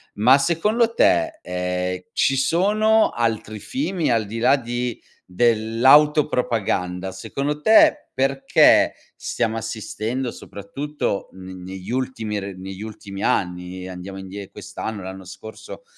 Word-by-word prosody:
Ma 125 +6 +6
secondo 210 +10 +1
te, 330 +2 +2
ehm, 90 0 -3
ci 135 - +2
sono 210 +9 +3
altri 110 -2 -2
fini 195 - -2
al 115 -2 +1
di 110 +3 -6
là 125 +4 +5
di 120 -1 -4 0.2
dell'autopropaganda? 115 - +2
Secondo 140 +10 -3
te, 300 - +6 0.2
perché 135 +1 +4 0.2
stiamo 115 0 -2
assistendo 115 +3 -4
soprattutto 115 +4 -5
ne 95 0 -10
negli 95 +1 -9
ultimi 120 -4 -2
r 100 -1 -7
negli 95 +1 -8
ultimi 100 -2 -8
anni, 90 0 -2
andiamo 95 +1 -8
indie 95 +1 -8
quest'anno, 105 +1 -6
l'anno 95 +1 -8
scorso 110 - -10
110 Hz, 115 wpm, -22 LUFS, 95-140 Hz, 0.2 s, Ma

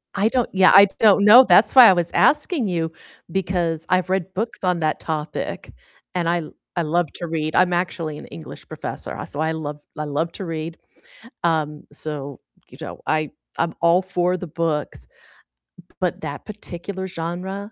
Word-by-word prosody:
I 200 +2 +2
don't 245 0 0
yeah, 190 -1 +6
I 200 0 +10
don't 205 -2 +5
know, 235 +5 +9
that's - - +5
why 255 -3 +11
I - - +6
was 175 -1 -1
asking 295 - +2
you, 165 -3 -1 0.4
because 170 -3 -1
I've 185 0 +1
read 190 -1 -1
books 225 +5 -3
on 180 -2 +1
that 155 -1 0
topic 155 -1 -4 0.4
and 170 -2 0
I 170 -1 +1 0.3
I 175 - +1
love 170 +2 +1
to 175 - -5
read. 155 -1 -2
I'm 180 -1 +4
actually 165 -3 -2
an - - -10
English 85 -1 -11
professor, - - -6
so 145 - -4
I 160 +1 +1
love 150 -2 -5 0.2
I 150 - -3
love 155 +3 -2
to 190 - -6
read, 165 0 -5 0.7
um, 155 -3 0
so, 145 -3 -6 0.3
you - - -15
know, - - -7
I 155 -1 0 0.3
I'm 165 0 0
all 170 +2 +4
for 180 -1 0
the 180 - -7
books, 150 - -3 0.8
b - - -31
but 180 -3 -2
that 145 -2 -6
particular 190 -2 -7
genre, 185 +5 -5
170 Hz, 175 wpm, -22 LUFS, 155-190 Hz, 0.8 s, why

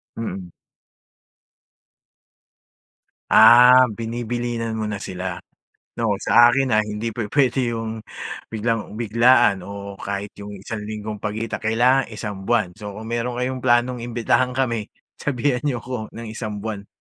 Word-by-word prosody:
Mm. 95 -5 -5 2.8
Ah 125 +3 +8
binibilinan 115 +1 -3
mo 110 - -2
na 105 -1 -5
sila, 90 -1 -5 0.6
'no? 115 -3 +1
Sa 120 +1 +6
akin 135 -1 +1
ah, 110 - +3
hindi 105 +2 -3
pwede 120 +2 0
yung 115 0 -4 0.5
biglang 115 -1 -2
biglaan 115 -2 +3
o 100 0 -8
kahit 100 0 -4
yung 105 0 -8
isang 100 +3 -6
linggong 105 0 -5
pagitan, 110 +2 -3
kailangan 120 +4 +2
isang 100 -3 -6
buwan. 110 -6 +2
So 105 -2 -7
kung 110 +2 -8
meron 120 +1 -2
kayong 125 +1 -2
planong 125 0 +2
imbitahan 120 +2 0
kami, 120 -5 -1 0.3
sabihan 130 -1 0
niyo 125 -5 -1
ko 125 -3 -5
ng 115 0 -7
isang 110 -2 -5
buwan. 105 -2 -5
115 Hz, 130 wpm, -22 LUFS, 105-120 Hz, 2.8 s, Ah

